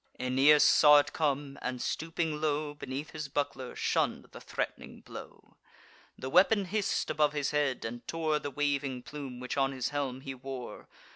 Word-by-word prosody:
Aeneas 135 +4 +5
saw 150 -1 +7
it 145 - +2
come, 145 -2 -1
and, 125 0 -3
stooping 160 0 -2
low 150 -1 0
Beneath 140 +1 -6
his 155 -2 -5
buckler, 140 -2 -3
shunn'd - - 0
the - - -11
threat'ning - - -5
blow. - - -12 0.6
The 130 - -6
weapon 195 +7 +4
hiss'd 205 +2 -1
above 150 -1 +2
his 145 -2 -1
head, 145 -5 0
and 120 +1 -6
tore 155 -2 0
The 145 - -4
waving 140 -3 -1
plume 135 -4 -7
which 125 +2 -4
on 135 0 +2
his 130 -2 -2
helm 135 -3 -3
he 135 0 -6
wore. 130 -1 -8
145 Hz, 165 wpm, -30 LUFS, 130-150 Hz, 0.6 s, saw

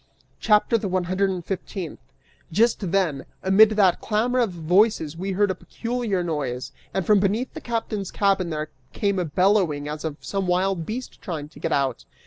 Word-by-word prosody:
CHAPTER 215 +2 +3
THE 205 - -3
ONE 185 -1 0
HUNDRED 185 +3 +1
AND 180 -3 -4
FIFTEENTH. 185 -2 -5 0.5
Just 215 0 +2
then, 175 -8 +1 0.2
amid 195 +3 +7
that 200 -5 +3
clamor 235 +4 +1
of 235 -3 +2
voices 175 -1 +2
we 190 +3 -3
heard 200 +1 +2
a - - 0
peculiar 230 -1 -3
noise, 140 -7 -3 0.2
and 190 -2 -1
from 210 -2 +5
beneath 210 +6 0
the 315 - -7
captain's 225 -5 -3
cabin 195 -3 +1
there 155 -1 -3 0.2
came 200 -2 0
a 180 - 0
bellowing 170 -3 +2
as 150 0 -5
of 155 -2 -4
some 195 -2 -3
wild 180 -1 +1
beast 245 +4 -6
trying 155 -7 -5
to - - -15
get - - -2
out. 135 -4 0
190 Hz, 180 wpm, -24 LUFS, 165-210 Hz, 0.5 s, amid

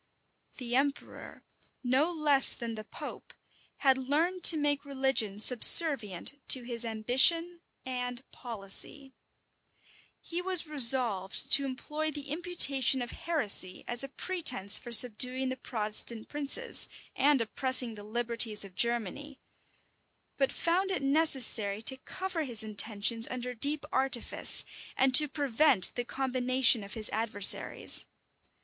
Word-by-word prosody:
The 245 -2 -6
emperor, 280 +2 -6 0.4
no 265 +7 -1
less 295 -5 +4
than 235 -2 -9
the 215 -1 -10
pope, - - -13 0.5
had 265 -1 0
learned 320 +8 -4
to 325 - +8
make 290 -1 -3
religion 265 -7 -3
subservient 250 - +6
to 255 - +2
his 235 -1 -3
ambition 265 +10 0 0.2
and 250 -1 -8
policy. 240 +5 -6 1.1
He 345 +1 -8
was 365 -2 +3
resolved 240 -9 +3
to 280 - +4
employ 300 +4 -7
the 290 -2 -10
imputation 280 -6 0
of 240 - -8
heresy 215 - -4
as 240 +2 +4
a 275 - -9
pretence 270 - -1
for 240 - -13
subduing 250 +3 +4
the 260 - -6
Protestant 220 -2 -7
princes, 295 - 0 0.3
and 280 0 0
oppressing 250 +1 -1
the 205 -1 -13
liberties 230 -1 -2
of 195 - -16
Germany; 240 +7 -5 1.0
but 270 -1 -3
found 365 +3 -3
it 370 -7 -5
necessary 265 -8 +2
to 265 +3 -3
cover 365 +4 -7
his 240 -5 -2
intentions 215 +1 -1
under 250 0 -7
deep 290 +5 -2
artifice, 265 -3 -1 0.3
and 265 -1 0
to 300 +4 +8
prevent 280 - +2
the 245 - -6
combination 255 -3 -1
of 200 - -11
his 220 -2 0
adversaries. 215 -2 0
260 Hz, 125 wpm, -27 LUFS, 230-290 Hz, 1.1 s, to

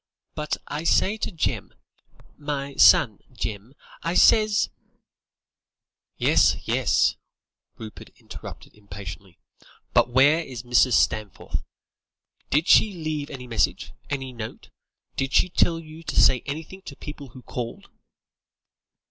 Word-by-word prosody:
But 150 -1 -3
I 150 +2 -4
says 205 +5 +2
to - - -3
Jem, 165 - -3 0.6
my 145 -1 -4
son, 110 -5 +5
'Jem,' 115 +2 -6 0.3
I 170 +2 -2
says 215 +2 +4 0.7
" - - -69 0.7
"Yes, - - +3
yes," - - +2 0.6
Rupert 110 -1 -10
interrupted - - -11
impatiently, 95 -2 -10 0.6
"but - - +4
where 140 +6 +5
is 130 -4 -8
Mrs. 125 +1 +3
Stanforth? 105 -2 0 0.9
Did 155 +5 +1
she 215 - +5
leave 155 -4 -4
any 130 -3 -8
message? 115 -3 -1 0.2
Any 135 -3 -4
note? 115 -2 -8 0.5
Did 135 0 -2
she 185 - +4
tell 170 -1 +2
you 160 0 -12
to 165 - -1
say 130 -2 +5
anything 160 +6 -6
to 140 - -9
people 150 -1 -9
who 125 +2 -14
called?" 120 -1 -6
140 Hz, 120 wpm, -24 LUFS, 120-155 Hz, 0.9 s, son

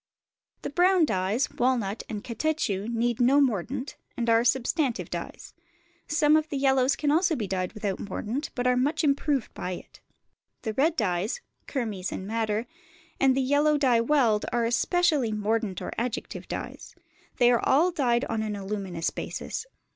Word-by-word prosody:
The - - -4
brown 360 +1 +4
dyes, 205 +2 0
walnut 235 -5 0
and 210 -1 -5
catechu, 230 -6 -1
need 235 0 0
no 265 +4 +5
mordant, 255 +1 -1 0.2
and 235 -1 +1
are 230 +1 +4
substantive 255 +2 0
dyes; - - -6 0.5
some 305 0 +4
of 310 0 +1
the 285 - -2
yellows 270 -1 +3
also 330 +4 +3
can - - -5
be 220 - -2
dyed 185 -2 -2
without 205 -3 -3
mordant, 220 +8 -4
but 245 - -2
are 250 0 +4
much 290 +6 +1
improved 280 -3 +1
by 180 - -4
it. - - -11 0.6
The 220 - -2
red 310 +7 +2
dyes, 205 - -1 0.3
kermes 215 -8 -3
and 190 - -5
madder, 220 +1 -1 0.5
and 265 -1 +4
the - - +3
yellow 290 +3 +3
dye 250 -5 +3
weld, 235 -5 +2
are 240 -1 +1
especially 280 +2 +2
mordant 215 -2 -1
or - - -4
adjective 240 +1 -4
dyes: - - -7 0.4
they 245 -1 +5
are 240 - +2
all 320 +7 +4
dyed 250 -6 +1
on 225 -1 -2
an 215 -1 -2
aluminous 195 -4 -3
basis. - - -5
240 Hz, 160 wpm, -27 LUFS, 215-285 Hz, 0.6 s, no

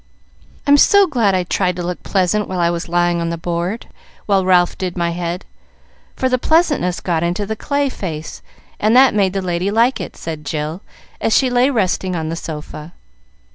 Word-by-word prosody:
"I'm 285 0 +6
so 400 +7 +6
glad 235 - +1
I 185 - +1
tried 180 0 0
to 175 - -4
look 180 0 -4
pleasant 200 +2 0
when 185 - -4
I 170 -1 +2
was 170 0 -4
lying 175 0 +1
on 165 - -1
the 170 - -3
board 175 +6 -3 0.4
while 195 -2 +2
Ralph 180 -1 +3
did 185 -1 -4
my 170 -1 0
head, 175 +1 -4 0.7
for 260 - 0
the 255 -1 +1
pleasantness 295 - +1
got 170 -3 -1
into 175 +4 -1
the 220 +2 -3
clay 285 +5 -1
face, 160 - -6 0.4
and 215 +3 +2
that 260 +1 +6
made 195 -3 +1
the 195 -1 -2
lady 180 +1 -1
like 230 +5 +2
it," - - -8
said 160 -2 -6
Jill, 155 +4 -4 0.4
as 225 - +3
she 260 -2 +2
lay 245 +2 +3
resting 190 -6 0
on 160 -2 -3
the 165 - -3
sofa. 155 0 -8
185 Hz, 195 wpm, -18 LUFS, 170-220 Hz, 0.7 s, I'm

